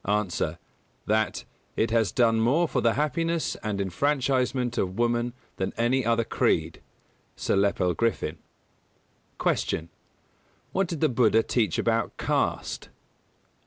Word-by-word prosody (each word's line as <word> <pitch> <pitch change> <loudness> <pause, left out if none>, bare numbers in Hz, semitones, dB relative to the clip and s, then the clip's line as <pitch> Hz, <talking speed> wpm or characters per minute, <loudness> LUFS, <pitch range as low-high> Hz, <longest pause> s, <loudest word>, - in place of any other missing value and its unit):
_ 105 -3 0
A. 80 +2 -1 0.5
That 110 -2 0 0.3
"it 110 - +1
has 110 -5 +2
done 115 -2 +3
more 140 +10 +3
for 130 - -1
the 115 -1 +2
happiness 165 +3 0
and 105 -2 -2
enfranchisement 125 - 0
of 95 0 -2
woman 120 0 +1 0.2
than 95 - -2
any 125 +3 +2
other 115 0 +2
creed" 80 -6 0 0.5
(Sir - - 0
Lepel 100 -2 +2
Griffin). 110 -8 -1 1.0
226. - - +1
Q. 80 +1 -2 0.8
_What 195 -1 +1
did 165 -4 -5
the 155 - +5
Buddha 115 -2 +3
teach 110 -9 0
about 115 -1 0
caste? - - -1
115 Hz, 130 wpm, -26 LUFS, 100-130 Hz, 1.0 s, the